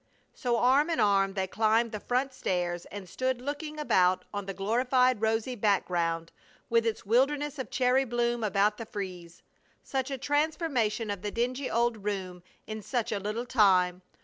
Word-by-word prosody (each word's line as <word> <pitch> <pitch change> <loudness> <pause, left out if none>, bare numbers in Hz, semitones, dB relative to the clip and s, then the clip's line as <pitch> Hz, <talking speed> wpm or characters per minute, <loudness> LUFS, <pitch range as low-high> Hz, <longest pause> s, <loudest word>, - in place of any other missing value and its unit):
So 240 -2 0
arm 270 +7 +4
in 330 - 0
arm 195 -1 +3
they 190 -1 0
climbed 220 +4 +2
the 215 - -4
front 255 +5 -1
stairs 175 -5 -2
and 200 -2 -8
stood 255 +6 -1
looking 295 +3 -5
about 185 -10 +2
on 205 -1 -4
the 195 - -3
glorified 250 +3 +2
rosy 225 +3 0
background 175 -6 0 0.4
with 230 0 +3
its 225 - -2
wilderness 280 +6 +1
of 260 - -4
cherry 255 +1 +2
bloom 240 -1 0
about 210 0 +2
the 230 - -7
frieze. 180 -5 -7 0.4
Such 265 0 -2
a 270 - -3
transformation 280 - 0
of 200 -2 -5
the 210 - -3
dingy 250 +5 -2
old 230 -2 0
room 190 -3 -4 0.2
in 215 0 -6
such 240 +2 -2
a 205 - -1
little 215 +4 -3
time! 185 -6 +3
225 Hz, 170 wpm, -29 LUFS, 195-255 Hz, 0.4 s, arm